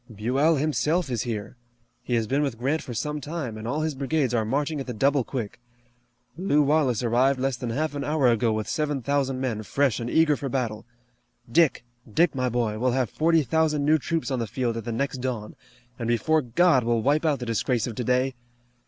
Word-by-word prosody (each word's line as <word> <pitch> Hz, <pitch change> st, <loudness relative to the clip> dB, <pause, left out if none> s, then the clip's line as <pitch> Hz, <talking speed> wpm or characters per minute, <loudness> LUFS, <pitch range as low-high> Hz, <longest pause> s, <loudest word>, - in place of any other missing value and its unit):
"Buell, 130 Hz, +10 st, +2 dB
himself, 155 Hz, +2 st, 0 dB
is 120 Hz, -3 st, -1 dB
here. 110 Hz, -1 st, -5 dB, 0.4 s
He 120 Hz, -, -2 dB
has 115 Hz, -1 st, +1 dB
been 135 Hz, +6 st, 0 dB
with 135 Hz, -6 st, -1 dB
Grant 140 Hz, +7 st, 0 dB
for -, -, -8 dB
some 150 Hz, +4 st, -3 dB
time, 145 Hz, -5 st, -4 dB
and 110 Hz, +1 st, -7 dB
all 150 Hz, +6 st, -1 dB
his 155 Hz, -1 st, -1 dB
brigades 135 Hz, -1 st, 0 dB
are 115 Hz, -2 st, +2 dB
marching 145 Hz, +7 st, -1 dB
at 135 Hz, -, -5 dB
the 125 Hz, -, -4 dB
double 140 Hz, +3 st, +2 dB
quick. 120 Hz, -3 st, -5 dB, 0.8 s
Lew 155 Hz, -5 st, +2 dB
Wallace 140 Hz, -5 st, +2 dB
arrived 130 Hz, +3 st, +2 dB
less 135 Hz, 0 st, 0 dB
than 120 Hz, 0 st, -5 dB
half 150 Hz, +6 st, -1 dB
an 145 Hz, -1 st, -3 dB
hour 150 Hz, -3 st, +2 dB
ago 115 Hz, -1 st, +2 dB
with 110 Hz, 0 st, -2 dB
seven 145 Hz, -4 st, -1 dB
thousand 135 Hz, -1 st, 0 dB
men 120 Hz, -5 st, -2 dB
fresh 130 Hz, +3 st, 0 dB
and 120 Hz, 0 st, -4 dB
eager 160 Hz, 0 st, +4 dB
for 140 Hz, -1 st, -4 dB
battle. 120 Hz, -4 st, -3 dB, 0.6 s
Dick! 165 Hz, -2 st, +3 dB, 0.3 s
Dick, 170 Hz, +9 st, +3 dB
my 130 Hz, -2 st, 0 dB
boy, 115 Hz, -3 st, -1 dB
we'll 125 Hz, +1 st, +1 dB
have 130 Hz, -2 st, 0 dB
forty 165 Hz, 0 st, +3 dB
thousand 150 Hz, +1 st, +1 dB
new 155 Hz, +1 st, +4 dB
troops 165 Hz, 0 st, -2 dB
on 130 Hz, -, 0 dB
the 115 Hz, -, -2 dB
field 120 Hz, +2 st, -2 dB
at 115 Hz, -2 st, -5 dB
the 120 Hz, -, -3 dB
next 130 Hz, +2 st, -2 dB
dawn, 125 Hz, -4 st, -4 dB, 0.4 s
and 115 Hz, -, -3 dB
before 135 Hz, +7 st, +2 dB
God 130 Hz, +2 st, +3 dB
we'll 115 Hz, -1 st, +1 dB
wipe 145 Hz, +4 st, +2 dB
out 155 Hz, -3 st, +2 dB
the 125 Hz, -, -6 dB
disgrace 115 Hz, 0 st, 0 dB
of 120 Hz, -, -4 dB
today! 125 Hz, +3 st, 0 dB
130 Hz, 215 wpm, -25 LUFS, 120-150 Hz, 0.8 s, eager